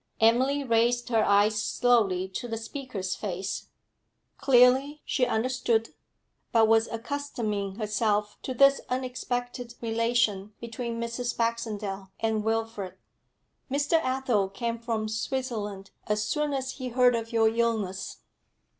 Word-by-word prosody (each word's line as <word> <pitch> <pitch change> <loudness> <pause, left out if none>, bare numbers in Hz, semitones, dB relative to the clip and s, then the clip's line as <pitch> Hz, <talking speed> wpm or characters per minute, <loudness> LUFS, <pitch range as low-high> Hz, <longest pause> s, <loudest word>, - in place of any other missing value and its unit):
Emily 260 +6 +3
raised 240 0 +2
her 225 -2 +3
eyes 210 +1 +3
slowly 210 -7 +2
to 195 +6 -5
the 225 -1 -3
speaker's 225 -6 -4
face; 190 -1 -4 0.7
clearly 265 +3 +4
she 250 -3 +1
understood, 235 -1 +1 0.6
but 225 -1 +5
was 225 0 +4
accustoming 230 -5 -3
herself 210 -1 0
to 260 - -4
this 275 +2 +5
unexpected 245 -1 -3
relation 225 -3 0
between 235 0 -5
Mrs. 235 +1 -3
Baxendale 215 -4 -2
and 220 -1 0
Wilfrid. 225 -3 -2 0.7
'Mr. 290 +4 +2
Athel 255 -7 +1
came 230 +3 -3
from 225 -2 -2
Switzerland 220 -4 -3 0.2
as 210 0 +1
soon 300 +7 -1
as 265 -1 -2
he 260 -1 -6
heard 250 0 +4
of 230 0 -3
your 225 -1 +4
illness.' 220 -5 -1
230 Hz, 120 wpm, -27 LUFS, 215-250 Hz, 0.7 s, but